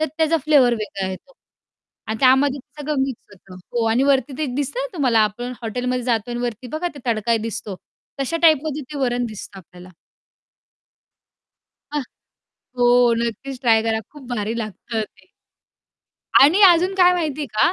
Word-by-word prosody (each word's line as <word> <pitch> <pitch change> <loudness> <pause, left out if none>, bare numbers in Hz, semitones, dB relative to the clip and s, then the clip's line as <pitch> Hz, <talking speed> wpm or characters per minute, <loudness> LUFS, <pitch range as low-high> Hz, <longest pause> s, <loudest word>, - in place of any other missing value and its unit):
तर 315 - +1
त्याचा 320 0 +3
फ्लेवर 275 -6 +4
वेगळा 205 -3 -4
येतो 190 - -10 0.7
अन् 220 0 -3
त्यामध्ये 265 +2 +4
ते 295 - -16
सगळं 300 +1 -2
मिक्स 265 -3 -4
होतं 185 -1 -15 0.2
हो 235 -1 0
आणि 235 +4 +2
वरती 270 -1 +1
ते 310 - -1
एक 255 -4 -3
दिसतं 290 - -2
ना - - -2
तुम्हाला, 255 -8 +2
आपण 220 +4 -1
हॉटेलमध्ये 250 +2 -2
जातोय 240 -1 -1
अन् 240 - -3
वरती 240 0 -4
बघा, 325 +3 -2
ते - - -10
तडका 230 0 +1
दिसतो, 215 -3 -5 0.4
तशा 275 +5 -1
टाइपमध्ये 310 -2 +3
ते 290 - -5
वरण 245 -2 0
दिसतं 210 -2 -9
आपल्याला. 180 0 -14 2.0
हां 295 - 0 0.8
हो 245 - +4 0.3
नक्कीच 245 +3 -4
ट्राय 225 -3 +3
करा, 220 0 0
खूप 285 -4 -13
भारी 215 0 -2
लागतं 220 +2 -5
ते. 215 - -13 1.2
आणि 315 +9 +5
अजून 360 +2 +4
काय 360 -1 +5
माहिती 310 -4 -2
आहे - - -4
का, 275 +11 +3
250 Hz, 165 wpm, -21 LUFS, 225-295 Hz, 2.0 s, आणि